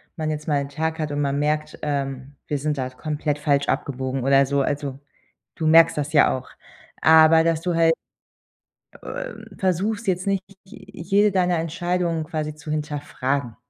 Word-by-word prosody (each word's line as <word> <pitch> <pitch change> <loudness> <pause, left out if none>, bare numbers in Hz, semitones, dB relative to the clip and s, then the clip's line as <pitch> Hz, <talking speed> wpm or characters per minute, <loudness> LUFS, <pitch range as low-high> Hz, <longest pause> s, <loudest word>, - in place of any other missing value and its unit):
man 155 -1 -3
jetzt 155 0 -4
mal 145 -2 +2
'n 140 - -6
Tag 160 +3 -3
hat 155 -2 -2
und 145 0 -1
man 140 0 0
merkt, 150 +1 -1
ähm, 140 -2 -3
wir 145 - -1
sind 150 +1 -2
da 130 -1 -2
komplett 150 +2 -3
falsch 140 -1 +1
abgebogen 130 -1 -2
oder 135 +1 +4
so, 140 +1 0
also, 140 -1 -2 0.6
du 160 - -1
merkst 165 0 +6
das 150 +1 -3
ja 145 - +5
auch. 130 - -11 0.5
Aber, 160 0 +7
dass 165 -1 +1
du 175 0 -1
halt, 165 0 +4 1.1
ähm, - - -7
versuchst 200 +5 -1
jetzt 185 -1 0
nicht 195 -1 0 0.2
j - - -12
jede 200 +4 +2
deiner 180 -2 +2
Entscheidungen 170 0 -1
quasi 155 -1 -4
zu 155 0 -9
hinterfragen. 145 -5 -3
155 Hz, 170 wpm, -23 LUFS, 140-165 Hz, 1.1 s, Aber